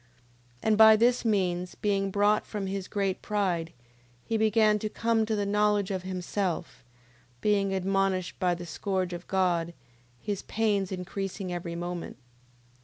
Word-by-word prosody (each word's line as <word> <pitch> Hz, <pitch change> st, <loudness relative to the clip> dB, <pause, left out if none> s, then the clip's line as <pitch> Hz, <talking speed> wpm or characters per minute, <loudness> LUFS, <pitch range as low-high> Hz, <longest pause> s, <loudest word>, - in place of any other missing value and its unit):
9:11. 120 Hz, -, -32 dB, 0.6 s
And 215 Hz, -1 st, +3 dB
by 220 Hz, 0 st, +9 dB
this 240 Hz, +3 st, +3 dB
means, 180 Hz, -5 st, 0 dB
being 195 Hz, -1 st, 0 dB
brought 205 Hz, +2 st, +2 dB
from 205 Hz, -2 st, -4 dB
his 195 Hz, -1 st, -4 dB
great 195 Hz, -2 st, -1 dB
pride, 180 Hz, -6 st, -1 dB, 0.5 s
he 225 Hz, -, -2 dB
began 215 Hz, -1 st, +3 dB
to 215 Hz, -, -3 dB
come 225 Hz, 0 st, +1 dB
to 220 Hz, -, 0 dB
the 205 Hz, -1 st, -1 dB
knowledge 205 Hz, -1 st, +2 dB
of 190 Hz, -1 st, -2 dB
himself, 185 Hz, -2 st, -3 dB, 0.6 s
being 200 Hz, +1 st, +1 dB
admonished 190 Hz, -1 st, 0 dB
by 180 Hz, -1 st, +2 dB
the 175 Hz, 0 st, -8 dB
scourge 185 Hz, +2 st, -2 dB
of 175 Hz, 0 st, -7 dB
God, 175 Hz, -3 st, 0 dB, 0.4 s
his 200 Hz, -, -3 dB
pains 205 Hz, -4 st, 0 dB
increasing 190 Hz, 0 st, -4 dB
every 170 Hz, -1 st, -4 dB
moment. 175 Hz, 0 st, -5 dB
195 Hz, 150 wpm, -28 LUFS, 180-210 Hz, 0.6 s, by